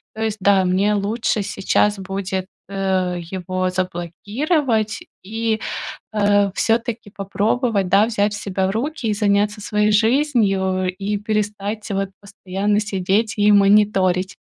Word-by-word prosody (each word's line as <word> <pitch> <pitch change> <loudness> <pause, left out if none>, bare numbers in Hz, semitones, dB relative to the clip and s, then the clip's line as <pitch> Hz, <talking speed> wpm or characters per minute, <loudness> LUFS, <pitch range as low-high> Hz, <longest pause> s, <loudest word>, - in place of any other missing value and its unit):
То 220 - -3
есть 220 -1 -1
да, 195 -1 +4
мне 195 +3 +2
лучше 210 +1 -1
сейчас 200 +1 +1
будет, 190 0 -4 0.2
э, 190 -2 -1
его 185 0 -2
заблокировать 210 - -1 0.2
и, 220 +2 -1 0.5
э, 205 -1 +3
всё-таки 230 0 -1
попробовать, 205 +1 0
да, 200 +3 +5
взять 210 -2 0
себя 190 -1 -2
в - - -1
руки 260 +4 -3
и 215 - +1
заняться 205 0 +1
своей 210 0 +1
жизнью, 205 -6 +2
и 205 +2 -2
перестать 210 0 -3
вот 195 -1 -1
постоянно 200 +1 -2
сидеть 205 +1 0
и 210 0 +4
мониторить. 195 -2 +3
205 Hz, 125 wpm, -20 LUFS, 190-215 Hz, 0.5 s, да